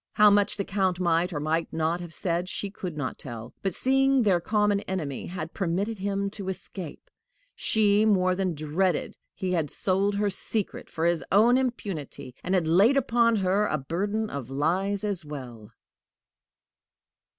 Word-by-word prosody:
How 210 0 +6
much 205 0 +3
the 200 - -2
Count 190 -2 0
might 175 0 +2
or 150 - -3
might 160 +2 -1
not 165 +2 0
have 175 -2 -8
said, 175 +1 -2
she 200 +2 -3
could 180 -5 -6
not 145 -3 -4
tell; 115 -3 -8
but, 195 -3 -2
seeing 270 0 +3
their 190 -5 +3
common 210 +1 +2
enemy 155 -8 -3
had 165 -2 -6
permitted 195 +4 -1
him 200 0 -1
to 195 -2 -5
escape, 185 -4 -7 0.4
she 210 -1 +3
more 185 -4 +3
than 185 -2 -1
dreaded 155 +5 0 0.2
he 185 -1 -2
had 165 -5 0
sold 195 +5 0
her 205 0 +1
secret 210 +2 -3
for 165 -1 -2
his 170 -1 +2
own 225 +5 +6
impunity, 200 - -3
and 185 - 0
had 175 -4 +1
laid 200 +12 +5
upon 235 -3 +3
her 200 +1 +2
a 155 - 0
burden 200 +10 -2
of 135 -4 -5
lies 185 +9 0
as 200 -5 -2
well. 125 -8 -9
185 Hz, 165 wpm, -27 LUFS, 165-205 Hz, 0.4 s, How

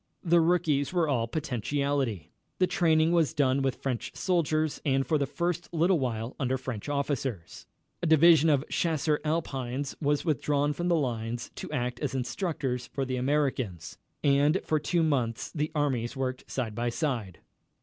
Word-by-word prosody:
The 170 -1 +4
rookies 160 -5 +2
were 175 -3 +1
all 120 -5 +1
potentiality. 140 - -2 0.3
The 185 - +4
training 165 -3 +3
was 165 -2 +2
done 135 -2 +2
with 135 -1 -2
French 130 -4 -2
soldiers 155 -4 0
and 135 -1 +1
for 155 -2 +1
the 140 - 0
first 175 +2 -2
little 170 +1 +3
while 115 -2 -3
under 130 -1 0
French 130 -1 -5
officers. 135 - -3 0.3
A 175 - 0
division 160 0 +6
of 145 -1 +2
Chasseurs 155 -2 0
Alpines 140 -4 -2
was 145 +1 +1
withdrawn 145 -1 +1
from 175 +3 -3
the 175 - +3
line 120 -5 -1 0.2
to - - -7
act 125 -4 -2
as 140 -3 -2
instructors 130 -2 -2
for 135 - -3
the 130 -1 -2
Americans, 130 - -1 0.2
and 145 +5 +4
for 155 - +1
two 165 +3 +1
months 125 -7 0
the 150 0 -2
armies 135 -4 -1
worked 130 -1 -3
side 120 -5 -3
by 120 +2 -1
side. 115 - -2
145 Hz, 160 wpm, -28 LUFS, 125-160 Hz, 0.3 s, division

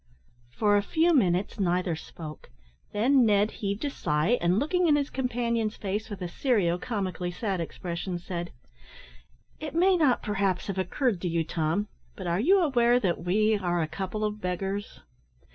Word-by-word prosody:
For 205 - +2
a - - +3
few 325 +11 +2
minutes 195 - +2
neither 180 -2 +1
spoke; 155 -1 -10 0.4
then 255 +5 +4
Ned 210 -1 +3
heaved 200 +5 -3
a 285 - -1
sigh, 155 - +1
and, 175 +2 +2
looking 345 +8 +2
in 300 - +5
his 285 -1 -1
companion's 235 -4 -1
face 210 +3 -3
with 200 -3 -6
a - - -2
serio 180 -4 +1
comically 185 -6 -3
sad 190 0 -2
expression, 175 +2 -4
said: 175 0 -5 1.1
"It 305 0 -6
may 370 +3 +4
not, 285 -7 +2
perhaps, 195 -3 0
have 195 -2 -3
occurred 215 - 0
to 180 - -1
you, 165 -1 0
Tom, 165 +5 -1 0.3
but 190 - -7
are 170 +1 0
you 375 - +4
aware 245 -6 +3
that 180 -6 -1
we 215 +5 +2
are 175 -4 0
a - - -2
couple 195 +5 -4
of 210 0 -2
beggars?" 195 +3 -3
200 Hz, 170 wpm, -27 LUFS, 180-240 Hz, 1.1 s, in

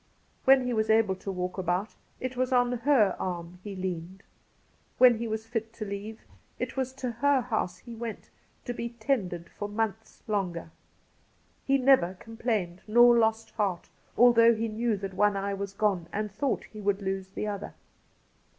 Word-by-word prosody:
When 265 -1 +6
he 250 - -1
was 220 -1 0
able 220 -3 +4
to 195 - -5
walk 180 0 -3
about, 185 +4 -1 0.3
it 255 0 -4
was 255 +1 0
on 245 -1 +3
her 245 -4 +3
arm 175 -1 -4
he 205 -2 -6
leaned. 185 0 -5 0.7
When 245 -3 +6
he 235 - -2
was 220 0 -3
fit 225 -1 -3
to 215 - -6
leave, 205 +2 -6 0.4
it - - -4
was 260 -1 -1
to 260 -2 -4
her 270 +3 +2
house 225 -7 -2
he 235 - -11
went 230 -1 -7 0.3
to 245 - -3
be 235 0 -4
tended 220 -8 -2
for 205 - -6
months 220 +1 -3
longer. 180 -6 -2 1.0
He 275 0 +4
never 255 -9 +4
complained 215 -4 -3
nor 240 +2 +7
lost 225 -1 +1
heart, 195 -6 -2 0.3
although 235 -1 +7
he 225 +1 -1
knew 225 0 -1
that 195 -1 -5
one 205 +1 +2
eye 200 +1 -2
was 200 0 -4
gone 195 -4 0
and 210 0 -3
thought 265 +7 -1
he 215 - -11
would 200 0 0
lose 190 0 -2
the 190 - -5
other. 205 -1 -5
215 Hz, 175 wpm, -28 LUFS, 195-235 Hz, 1.0 s, nor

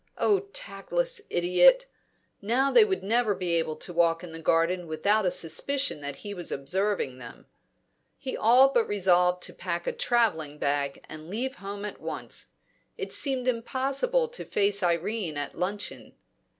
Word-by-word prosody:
Oh, 405 -1 +3
tactless - - -2
idiot! 180 - +4 0.6
Now 250 +7 +1
they 465 - +7
would 390 -3 -1
never 220 0 +1
be 180 -2 -3
able 165 -2 0
to 175 - -7
walk 165 0 +2
in 175 - -8
the 165 - -8
garden 165 +2 +1
without 200 +6 +1
a - - +4
suspicion 265 - 0
that 145 -1 -4
he 205 - -4
was 175 -3 -5
observing 160 -2 -1
them. 120 -2 -11 0.7
He 265 -2 -5
all 250 +5 +6
but 240 -4 +1
resolved 180 -2 +2
to - - -3
pack 170 -2 -4
a - - -1
travelling 160 - 0
bag 140 -1 -2
and 155 +1 -9
leave 255 +7 -3
home 200 +1 -6
at 210 - -7
once. - - -5 0.5
It - - -3
seemed 265 -3 0
impossible 270 - 0
to - - -7
face 200 0 +3
Irene 175 -1 -1
at 145 - -3
luncheon. 200 +3 -4
200 Hz, 160 wpm, -27 LUFS, 170-255 Hz, 0.7 s, they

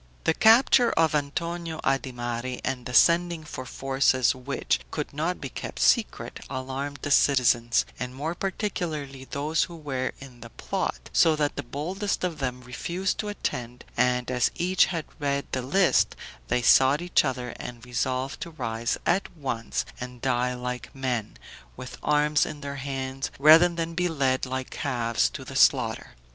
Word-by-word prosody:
The 160 - +3
capture 235 +4 +5
of 160 -1 +3
Antonio 165 +3 -2
Adimari 125 -2 -2
and 130 -2 -3
the 125 - -6
sending 170 -1 +4
for 130 -4 -7
forces, 135 -1 +2
which 130 +2 -1
could 150 -2 -4
not 165 +5 -1
be 140 - -5
kept - - -7
secret, - - +1
alarmed 135 +2 -4
the 145 - -2
citizens, 120 -4 +4
and 125 0 -5
more 155 +5 -3
particularly 160 -9 -4
those 150 +4 0
who 170 - -11
were 135 -5 -3
in 130 -3 -13
the 115 - -9
plot, - - -4
so 160 -1 +5
that 150 -1 0
the - - -3
boldest 180 - -3
of 175 -3 -2
them 125 -2 -3
refused 175 +9 -3
to 210 - -2
attend, 125 - -4
and 125 0 +1
as 125 -1 +2
each 185 +2 +3
had 165 -4 -3
read 140 -1 -1
the 130 - -1
list, 175 +8 +3 0.3
they 125 0 0
sought 130 - +5
each 180 - +3
other, 125 -3 -2
and 120 -1 -8
resolved 130 +1 -2
to - - -4
rise 115 -7 -2
at 190 +3 +1
once 120 -6 -3
and 125 0 -7
die 125 0 0
like 125 +1 -5
men, 125 -5 -3 0.4
with 130 - -9
arms 150 0 +3
in 150 - -5
their 140 -1 -5
hands, 135 -1 -4
rather 160 +5 +8
than 170 -1 -3
be 180 +1 +1
led 135 -5 0
like 130 0 -4
calves 115 -2 0
to - - -8
the - - -9
slaughter. - - +2
135 Hz, 165 wpm, -26 LUFS, 125-160 Hz, 0.4 s, rather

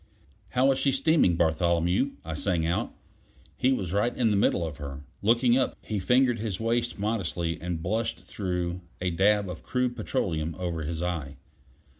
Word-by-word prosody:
"How 135 +2 +5
is 135 - 0
she 140 - +3
steaming, 135 - +3
Bartholomew?" 85 - +2
I 80 - -4
sang 85 0 0
out; 85 +2 -1 0.6
he 130 - +2
was 95 -9 -1
right 110 +4 +1
in 115 -3 +3
the - - +2
middle 95 -3 +2
of 75 -3 -6
her. 70 -1 -7 0.2
Looking 120 +3 +4
up, - - -1
he 105 -2 -2
fingered 125 +4 +3
his 105 -4 -3
waste 120 +1 0
modestly 90 -6 -2
and 85 -1 -3
blushed 110 +5 -1
through 90 -2 -3 0.2
a 90 0 -1
dab 100 +3 +3
of 90 -3 -6
crude 125 -1 -1
petroleum 80 - -2
over 85 -3 -3
his 80 +2 -3
eye. 80 -6 -3
95 Hz, 170 wpm, -27 LUFS, 85-115 Hz, 0.6 s, How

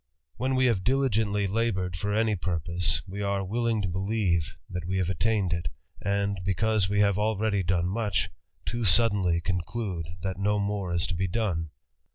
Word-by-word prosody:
When 130 +1 0
we 130 0 +3
have 110 -7 +2
diligently 110 -5 +2
laboured 95 -4 0
for 100 +5 -2 0.3
purpose, 85 -2 0
we 100 +2 -5
are 100 -1 0
willing 115 +2 0
to - - 0
believe 95 - 0
that 90 -2 -5
we 95 +2 -1
have 95 -1 +1
attaine 95 +1 +1 0.5
and, 100 -1 0
because 100 +1 +1
we 100 0 +3
have 100 -1 +3
already 105 -1 +1
done 90 -1 +1
much, 100 -3 0 0.3
too 120 - -2
sudd 105 +4 +5 0.3
conclude 90 -1 -2 0.2
that 95 -1 -3
no 105 +1 +2
more 100 -2 -1
is 85 -1 +1
to - - -3
be 95 +2 0
done. 90 -5 -1
100 Hz, 165 wpm, -28 LUFS, 90-110 Hz, 0.5 s, sudd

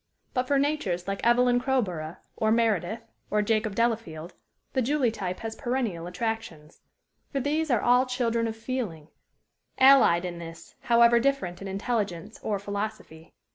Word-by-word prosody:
But 255 -1 0
for 280 - +2
natures 275 - -1
like 195 0 -3
Evelyn 245 +1 +4
Crowborough 185 -11 -1 0.2
or 220 0 +1
Meredith 220 -2 +1 0.3
or 210 0 +1
Jacob 215 -1 0
Delafield 210 -8 -1 0.4
the 260 - +1
Julie 260 -1 +1
type 185 -4 -5
has 225 0 -5
perennial 235 -10 -2
attractions. 180 -5 -5 0.5
For 275 - -1
these 300 +4 0
are 240 -5 +2
all 250 +2 +4
children 235 -2 0
of 220 - -4
feeling, 225 - -4 0.7
allied 260 -10 +6
in 175 -1 -5
this, 165 0 -10
however 235 -1 +5
different 235 -10 -1
in 195 - -6
intelligence 200 -1 -3
or 210 -2 -1
philosophy. 200 -5 -6
225 Hz, 145 wpm, -27 LUFS, 180-245 Hz, 0.7 s, allied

